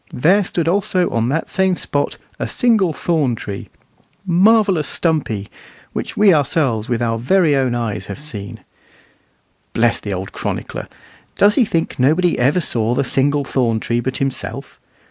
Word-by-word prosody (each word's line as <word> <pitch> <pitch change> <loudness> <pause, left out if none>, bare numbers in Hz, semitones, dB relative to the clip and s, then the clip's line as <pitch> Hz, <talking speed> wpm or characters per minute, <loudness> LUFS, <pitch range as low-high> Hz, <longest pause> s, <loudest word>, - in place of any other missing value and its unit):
There 180 +11 +3
stood 170 -3 -2
also 185 0 +1
on 115 +1 0
that 160 +4 -1
same 190 -1 +1
spot 145 -4 -1 0.2
a - - -2
single 220 -8 +2
thorn 150 -6 0
tree, 100 -2 -7 0.6
marvellous 190 -3 +3
stumpy 135 - -1 0.5
(which - - -5
we 205 -3 +6
ourselves 135 -7 0
with 120 -1 0
our 115 -1 -1
very 155 +4 +3
own 130 -3 +1
eyes 115 -3 -3
have 100 - -6
seen)." 110 -9 -8 1.1
Bless 115 0 +2
the 105 - -6
old 95 0 -4
chronicler! - - -5 0.5
Does 205 +1 +5
he 245 0 +3
think 170 -10 -2
nobody 160 +6 +2
ever 135 +8 +3
saw 120 -7 0
the - - +1
"single 140 +2 +1
thorn 120 -5 0
tree" 120 +2 -1
but 130 +2 -3
himself? 135 -1 -4
145 Hz, 155 wpm, -18 LUFS, 120-180 Hz, 1.1 s, we